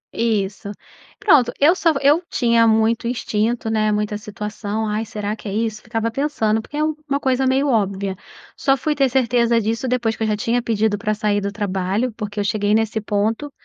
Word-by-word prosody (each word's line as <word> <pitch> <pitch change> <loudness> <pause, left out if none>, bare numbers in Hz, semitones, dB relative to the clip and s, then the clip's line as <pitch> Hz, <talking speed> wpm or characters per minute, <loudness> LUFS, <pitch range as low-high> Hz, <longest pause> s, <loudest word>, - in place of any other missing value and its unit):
Isso. 210 -2 -1 0.5
Pronto, 280 - +4
eu 305 +5 +6
só 330 -3 +2
eu 290 +4 +4
tinha 230 -2 +3
muito 225 +1 +2
instinto, 230 -1 -1
né, 215 -1 +1
muita 210 0 -1
situação 210 +1 -4
ai 215 +2 -2
será 210 0 -4
que 215 - -10
é - - -4
isso? 220 0 -2
Ficava 225 0 -2
pensando, 225 -5 0
porque 295 - -9
é 305 - +1
uma 305 -2 -2
coisa 260 -1 +1
meio 270 +2 +2
óbvia. 200 -5 0 0.4
Só 270 0 +2
fui 300 +3 -1
ter 275 -2 +2
certeza 235 -2 +2
disso 230 +4 -2
depois 235 -3 0
que - - -16
eu - - +1
já 215 - +1
tinha 235 +3 0
pedido 220 -2 0
pra 215 -1 -1
sair 205 -1 0
do 200 - -2
trabalho 200 +3 -1
porque 210 -2 -5
eu 205 - +1
cheguei 205 0 +1
nesse 220 0 0
ponto, 220 +7 -1
225 Hz, 195 wpm, -20 LUFS, 210-250 Hz, 0.5 s, eu